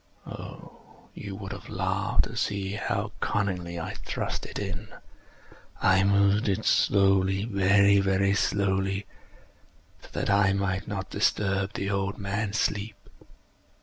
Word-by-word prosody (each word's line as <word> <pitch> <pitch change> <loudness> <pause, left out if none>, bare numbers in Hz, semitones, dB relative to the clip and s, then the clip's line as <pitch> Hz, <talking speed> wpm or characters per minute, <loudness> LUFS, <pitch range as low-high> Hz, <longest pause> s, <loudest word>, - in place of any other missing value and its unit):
Oh, - - -10 0.3
you 100 -2 -7
would 95 -1 -7
have 95 -1 -8
laughed 95 +1 0
to 115 - -7
see 100 -5 -1
how 105 0 -2
cunningly 90 -4 -1
I 80 - -4
thrust - - -3
it - - -7
in! 95 -3 -4 0.9
I 95 0 +4
moved 100 +2 +3
it 95 - -1
slowly—very, 100 +1 +4
very 100 0 +2
slowly, 95 0 0 1.0
so - - -14
that - - -1
I 100 -1 +4
might 95 -1 -1
not 95 -3 -4
disturb 95 -1 +1
the 100 +1 -2
old 100 0 -1
man's 100 +1 -2
sleep. 105 +2 -1
100 Hz, 125 wpm, -27 LUFS, 95-100 Hz, 1.0 s, I